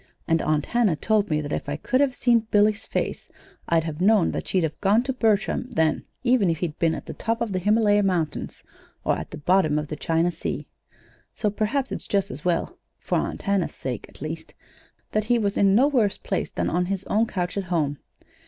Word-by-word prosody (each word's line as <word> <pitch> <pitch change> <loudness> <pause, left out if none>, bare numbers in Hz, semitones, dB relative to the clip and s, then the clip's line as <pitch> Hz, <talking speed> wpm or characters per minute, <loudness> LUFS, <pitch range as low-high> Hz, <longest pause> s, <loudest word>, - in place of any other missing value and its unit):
And 165 0 +2
Aunt 155 -1 +1
Hannah 235 -8 +2
told 210 +5 +1
me 155 -1 +1
that 145 -1 -4
if - - -3
I 145 - -1
could 255 - 0
have 275 -3 +2
seen 235 -2 +2
Billy's 210 0 +2
face - - -3 0.4
I'd 165 -1 +3
have 160 0 -5
known 205 -2 +4
that - - -4
she'd 185 -2 +1
have 160 -1 -3
gone 205 +4 +4
to 265 +1 -2
Bertram 220 0 +1
then 160 -1 +1 0.2
if 220 -10 +3
he'd 155 -2 -4
been 165 -1 +2
at - - -7
the - - -6
top 230 +1 -2
of 230 -3 -2
the 185 - 0
Himalaya 205 +1 +3
Mountains, 175 -6 -2 0.4
or - - +3
at - - -6
the - - -8
bottom 155 -1 +2
of 150 -1 -3
the 150 - -3
China 165 +3 +1
Sea. - - -4 0.7
So 210 - 0
perhaps 230 +6 -1
it's - - -4
just 200 -1 0
as 130 +4 -8
well 175 -2 -1 0.2
for - - -1
Aunt - - -4
Hannah's 200 -3 0
sake, 125 -5 -5
at - - -11
least 160 +1 -6 0.6
that 215 0 0
he 240 +2 +3
was 205 -3 0
in 195 -1 +4
no 260 +6 +5
worse 235 -9 +2
place - - -2
than - - -2
on 180 +1 0
his 195 0 -2
own 220 +3 +1
couch 180 -3 -3
at 200 -2 -2
home. 155 -5 -1
195 Hz, 220 wpm, -24 LUFS, 160-215 Hz, 0.7 s, no